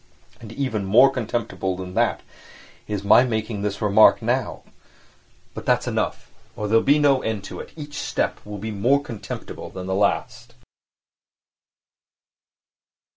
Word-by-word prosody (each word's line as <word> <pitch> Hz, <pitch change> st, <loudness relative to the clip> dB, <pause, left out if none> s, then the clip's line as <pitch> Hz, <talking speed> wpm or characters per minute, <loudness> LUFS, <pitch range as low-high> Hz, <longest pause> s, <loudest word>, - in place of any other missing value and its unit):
And 110 Hz, -2 st, -11 dB
even 115 Hz, -6 st, -2 dB
more 120 Hz, +8 st, +6 dB
contemptible 115 Hz, -6 st, -3 dB
than 90 Hz, 0 st, -7 dB
that -, -, +1 dB, 0.7 s
is 105 Hz, -2 st, -3 dB
my 105 Hz, +4 st, +6 dB
making 110 Hz, -3 st, -2 dB
this 105 Hz, +1 st, -3 dB
remark 105 Hz, +1 st, +6 dB
now. 120 Hz, +1 st, -2 dB, 0.9 s
But -, -, -9 dB
that's -, -, +2 dB
enough, -, -, -3 dB, 0.2 s
or 105 Hz, -, -3 dB
there 115 Hz, +2 st, +4 dB
will -, -, -3 dB
be 145 Hz, +2 st, +4 dB
no 140 Hz, -3 st, +3 dB
end 110 Hz, -3 st, -3 dB
to -, -, -8 dB
it; -, -, -9 dB
each 145 Hz, -2 st, -7 dB
step -, -, -2 dB
will 105 Hz, 0 st, -7 dB
be 110 Hz, +3 st, -5 dB
more 125 Hz, +8 st, +2 dB
contemptible 115 Hz, -7 st, -7 dB
than 90 Hz, -1 st, -7 dB
the 95 Hz, -, -2 dB
last.... 100 Hz, +1 st, -1 dB
110 Hz, 145 wpm, -23 LUFS, 100-130 Hz, 0.9 s, more